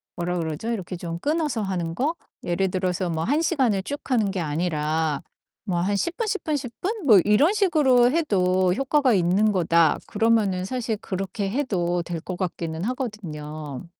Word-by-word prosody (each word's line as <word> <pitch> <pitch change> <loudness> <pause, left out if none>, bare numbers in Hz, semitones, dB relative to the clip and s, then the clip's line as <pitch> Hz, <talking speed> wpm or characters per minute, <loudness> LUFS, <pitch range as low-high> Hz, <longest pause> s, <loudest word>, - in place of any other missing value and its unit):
뭐라 175 0 -2
그러죠 160 +8 -3
이렇게 185 -4 -4
좀 170 -1 -5
끊어서 300 - 0
하는 175 -4 -2
거? 295 - 0 0.3
예를 180 +2 0
들어서 185 -1 -1
뭐 160 0 -1
1 295 +7 +1
시간을 255 - +1
쭉 285 +7 -4
하는 220 -6 +2
게 190 - -3
아니라 155 -1 -1 0.4
뭐 180 -4 -1
한 200 +3 0
10 340 - -2
분, 455 - -1
10 405 -1 -2
분, 305 -2 0
10 255 -4 -4
분 405 -2 -3
뭐 215 -7 +8
이런 250 - +4
식으로 295 - +4
해도 185 - +2
효과가 270 0 +2
있는 195 +4 +3
거다. 170 -4 +3
그러면은 210 -4 +1
사실 230 -1 -2
그렇게 195 +1 -4
해도 180 -10 0
될 170 -1 -5
것 180 0 -6
같기는 170 -2 -3
하거든요. 155 - -5
195 Hz, 305 characters per minute, -24 LUFS, 175-255 Hz, 0.4 s, 뭐